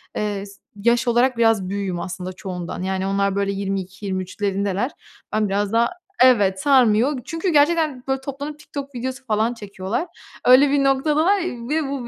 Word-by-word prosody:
eee, 205 -2 -2
s 200 0 -15
yaş 235 +4 +1
olarak 240 +1 +3
biraz 225 -5 +2
büyüğüm 195 -3 -3
aslında 185 +1 -5
çoğundan, 180 -2 -6
yani, 190 0 -1
onlar, 200 0 0
böyle, 200 0 0
22-23'lerindeler. 195 +2 -2 0.4
Ben 215 -2 +1
biraz 200 +1 0
daha, 230 +1 +3 0.3
evet, 205 -7 +4
sarmıyor 255 0 +4
çünkü 330 +3 -2
gerçekten, 300 -3 +2
böyle, 265 0 -1
toplanıp 285 +2 -6
TikTok 280 -2 -8
videosu 260 +2 -5
falan 220 +1 +1
çekiyorlar. 205 - -4 0.4
Öyle 260 +3 +7
bir 280 0 +2
noktadalar 305 +8 +2 0.3
ve 305 -2 0
bu 255 -4 -4
230 Hz, 150 wpm, -22 LUFS, 195-275 Hz, 0.4 s, Öyle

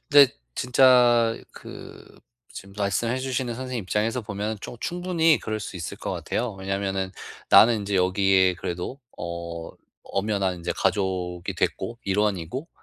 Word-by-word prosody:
근데 145 -3 +7 0.2
진짜 120 -2 +5 0.2
그 - - -12 0.3
지금 100 0 -10
말씀해 115 +5 0
주시는 130 -2 -2
선생님 130 -2 -4
입장에서 110 +6 -1
보면 105 +1 -3
좀 - - -8
충분히 175 -3 +2
그럴 110 -1 -4
수 100 - -6
있을 85 - -6
것 - - -4
같아요. 120 -2 -2
왜냐면은 95 0 -2 0.4
나는 115 -1 +7
인제 100 -1 -1
여기에 95 0 +3
그래도 90 +9 -5 0.2
어 85 -1 -5 0.3
엄연한 100 -3 -1
이제 85 - -2
가족이 90 -2 -1
됐고, 115 0 -2
일원이고. 105 - -1
105 Hz, 300 characters per minute, -25 LUFS, 95-120 Hz, 0.4 s, 근데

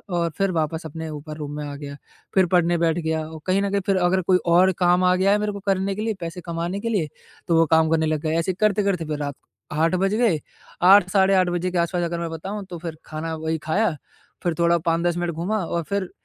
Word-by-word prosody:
और 170 -1 +1
फिर 195 -1 +1
वापस 160 -1 -2
अपने 160 +2 -6
ऊपर 150 +1 -7
रूम 150 -1 -5
में 150 - -4
आ 145 - -6
गया 140 -1 -7 0.4
फिर 190 -1 +5
पढ़ने 175 -1 +3
बैठ 165 0 +2
गया 160 -1 -1
और 160 0 -9
कहीं 190 +2 +2
न 200 - 0
कहीं 200 0 +1
फिर 195 - +3
अगर 185 +1 +2
कोई 180 +1 +3
और 180 +3 +5
काम 180 0 +3
आ 180 0 +4
गया 195 +2 +3
है 205 - +4
मेरे 210 0 -1
को 200 - -6
करने 195 0 +1
के 210 - -4
लिए 225 - 0
पैसे 170 +1 -5
कमाने 170 +3 -3
के 230 - -2
लिए 175 -9 0 0.4
तो 165 - +3
वो 165 - +5
काम 160 0 +4
करने 160 -1 +2
लग 155 -1 -1
गए। 160 0 -1
ऐसे 185 +3 -1
करते-करते 200 -4 +1
फिर 150 -1 -3
रात 145 -1 -3
को - - -14
8 165 +2 +3
बज 195 +2 +1
गए, 220 -10 +2 0.4
8 185 0 +7
साढ़े 195 0 +3
8 185 -1 +3
के 175 +1 -1
आस-पास 170 +1 0
अगर 170 0 -2
मैं 170 -1 -3
बताऊँ 195 +6 -5
तो 175 - -6
फिर 165 -1 -6
खाना 160 +1 -4
वही 160 0 -2
खाया 185 +1 +1 0.5
फिर 175 - +1
थोड़ा 170 0 +4
5-10 170 +1 +1
मिनट 175 -1 -1
घूमा 180 +7 -1
और 170 0 -2
फिर 200 -2 -1
175 Hz, 250 wpm, -23 LUFS, 160-190 Hz, 0.5 s, 8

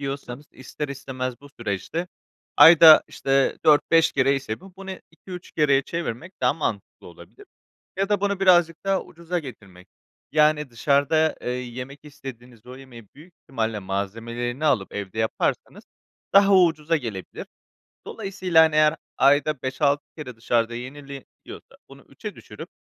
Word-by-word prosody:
yiyorsanız, 140 0 -6
ister 135 +3 -7
istemez 130 -2 -6
bu 145 - -14
süreçte 120 - -4 0.5
ayda, 165 -1 +9
işte, 135 0 0
4-5 160 +2 +4
kere 135 +1 +2
ise 135 -3 -5
bu, 190 0 -16
bunu 195 0 -9 0.2
2-3 180 +1 -11
kereye 140 -3 +2
çevirmek 165 +1 -5
daha - - +3
mantıklı - - -5
olabilir 410 -1 -15 0.5
ya 195 +1 0
da 205 -1 +1
bunu 200 -1 -1
birazcık 175 -2 +3
daha 195 -1 +1
ucuza 170 +1 -5
getirmek, 100 - -13 0.4
yani, 150 -1 +2
dışarıda, 145 +6 +1
eee, - - -4
yemek 125 +2 -6
istediğiniz 125 -5 -12
o 125 +1 -11
yemeği 120 -5 -14
büyük 165 +4 -16
ihtimalle, 110 -4 -3
malzemelerini 115 +8 -4
alıp 120 -10 0
evde 100 +1 -6
yaparsanız 110 0 -2 0.5
daha 200 0 +6
ucuza 165 -2 +2
gelebilir. 110 -9 -7 0.6
Dolayısıyla, 185 -4 +1
hani, 160 -1 0
eğer 155 +1 +4 0.2
ayda 145 +1 +2
5-6 140 +2 0
kere 125 -6 -8
dışarıda 115 0 -1
yeniliyorsa, 140 +2 -11
bunu - - -15
3'e - - -9
düşürüp - - -11
140 Hz, 135 wpm, -23 LUFS, 120-165 Hz, 0.6 s, ayda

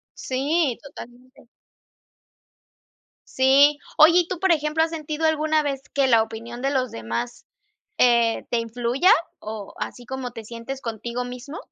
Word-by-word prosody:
Sí, 275 +1 0
totalmente. 255 -3 -13 1.8
Sí. 280 +3 +4 0.2
Oye, 335 +3 +7
y 345 - -3
tú, 370 - -4
por 380 -1 +3
ejemplo, 305 0 +1
¿has 325 - +1
sentido 310 0 -2
alguna 310 0 +2
vez 275 -2 -3
que 275 -1 +3
la 230 -3 +5
opinión 230 +2 -8
de 275 - +1
los 255 -3 0
demás, 115 +2 -5 0.5
eh, 235 -2 +3
te 240 - +1
influya 240 - +1 0.3
o 215 -2 -7
así 245 - -6
como 260 -2 -5
te 225 -2 -9
sientes 235 +4 -7
contigo 235 +2 -4
mismo? 250 +5 -8
260 Hz, 145 wpm, -23 LUFS, 235-300 Hz, 1.8 s, Oye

